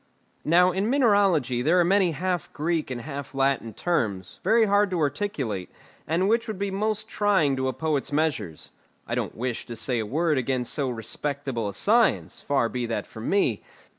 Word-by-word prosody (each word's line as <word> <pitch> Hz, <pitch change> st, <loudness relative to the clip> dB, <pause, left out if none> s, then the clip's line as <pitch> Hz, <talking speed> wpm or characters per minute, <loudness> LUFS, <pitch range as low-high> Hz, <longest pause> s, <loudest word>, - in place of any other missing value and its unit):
Now 180 Hz, +3 st, +4 dB
in 195 Hz, +4 st, -1 dB
mineralogy 200 Hz, -, +3 dB
there 165 Hz, +7 st, +3 dB
are -, -, +5 dB
many 185 Hz, -2 st, +3 dB
half 180 Hz, +2 st, -2 dB
Greek 160 Hz, 0 st, -1 dB
and 125 Hz, -2 st, -4 dB
half 140 Hz, 0 st, -7 dB
Latin 135 Hz, -4 st, +1 dB
terms, 100 Hz, -, -2 dB
very 225 Hz, +4 st, +4 dB
hard 205 Hz, 0 st, +3 dB
to 180 Hz, -2 st, -1 dB
articulate, 140 Hz, -, -2 dB, 0.4 s
and 175 Hz, +4 st, +1 dB
which 230 Hz, +2 st, +1 dB
would 215 Hz, -3 st, -4 dB
be 200 Hz, 0 st, -2 dB
most 215 Hz, +2 st, -1 dB
trying 195 Hz, -, +2 dB
to 130 Hz, 0 st, 0 dB
a 130 Hz, -, -1 dB
poet's 155 Hz, -4 st, -1 dB
measures. 145 Hz, -, -2 dB, 0.3 s
I -, -, -5 dB
don't -, -, -2 dB
wish 120 Hz, 0 st, -3 dB
to 120 Hz, -, -6 dB
say 115 Hz, +2 st, -1 dB
a 110 Hz, -, -2 dB
word 155 Hz, +3 st, +1 dB
against 125 Hz, -1 st, -1 dB
so 140 Hz, -4 st, -1 dB
respectable 125 Hz, 0 st, -3 dB
a -, -, -7 dB
science, 230 Hz, +2 st, +2 dB
far 135 Hz, -5 st, +1 dB
be 120 Hz, 0 st, -3 dB
that 115 Hz, -, -2 dB
from 110 Hz, +1 st, -7 dB
me. 160 Hz, -, +2 dB
150 Hz, 185 wpm, -25 LUFS, 125-190 Hz, 0.4 s, are